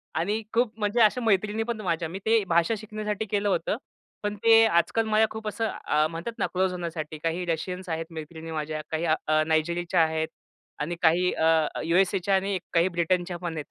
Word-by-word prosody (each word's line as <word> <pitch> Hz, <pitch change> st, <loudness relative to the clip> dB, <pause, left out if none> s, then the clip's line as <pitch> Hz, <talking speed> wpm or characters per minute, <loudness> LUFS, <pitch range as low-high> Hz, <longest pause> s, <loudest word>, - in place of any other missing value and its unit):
आणि 205 Hz, +7 st, 0 dB
खूप 235 Hz, -1 st, +2 dB
म्हणजे 210 Hz, +3 st, +1 dB
अशा 220 Hz, +3 st, +4 dB
मैत्रिणी 215 Hz, 0 st, +1 dB
पण 225 Hz, -2 st, -4 dB
माझ्या 165 Hz, -3 st, -1 dB
मी 190 Hz, -, -6 dB
ते 220 Hz, -1 st, +4 dB
भाषा 170 Hz, +5 st, +2 dB
शिकण्यासाठी 215 Hz, 0 st, -4 dB
केलं 205 Hz, 0 st, 0 dB
होतं. -, -, 0 dB, 0.5 s
पण 205 Hz, 0 st, -1 dB
ते 225 Hz, 0 st, +7 dB
आजकाल 220 Hz, +3 st, +2 dB
माझ्या 220 Hz, 0 st, +3 dB
खूप 220 Hz, 0 st, -7 dB
असं 210 Hz, -8 st, 0 dB
म्हणतात 170 Hz, +8 st, -5 dB
ना -, -, +2 dB
अ, -, -, -1 dB
क्लोज 185 Hz, 0 st, +1 dB
होण्यासाठी, 165 Hz, -3 st, -5 dB
काही 170 Hz, +2 st, -1 dB
रशियन्स 180 Hz, +3 st, -3 dB
आहेत 165 Hz, 0 st, -2 dB
मैत्रिणी 160 Hz, +1 st, -8 dB
माझ्या 155 Hz, 0 st, -3 dB
काही 160 Hz, +1 st, -1 dB
अ, 155 Hz, -1 st, +2 dB
नायजेरियाच्या 170 Hz, +2 st, +1 dB
आहेत. 160 Hz, 0 st, 0 dB, 0.5 s
आणि 165 Hz, +4 st, -2 dB
काही 175 Hz, +2 st, +4 dB
अ, 160 Hz, -1 st, +3 dB, 0.2 s
यू-एस-एच्या 190 Hz, +3 st, +2 dB
आणि 195 Hz, 0 st, 0 dB, 0.2 s
काही 170 Hz, +2 st, +4 dB
ब्रिटनच्या 175 Hz, +1 st, 0 dB
पण 170 Hz, -2 st, -5 dB
आहेत. 150 Hz, -, -4 dB
180 Hz, 185 wpm, -26 LUFS, 160-210 Hz, 0.5 s, ते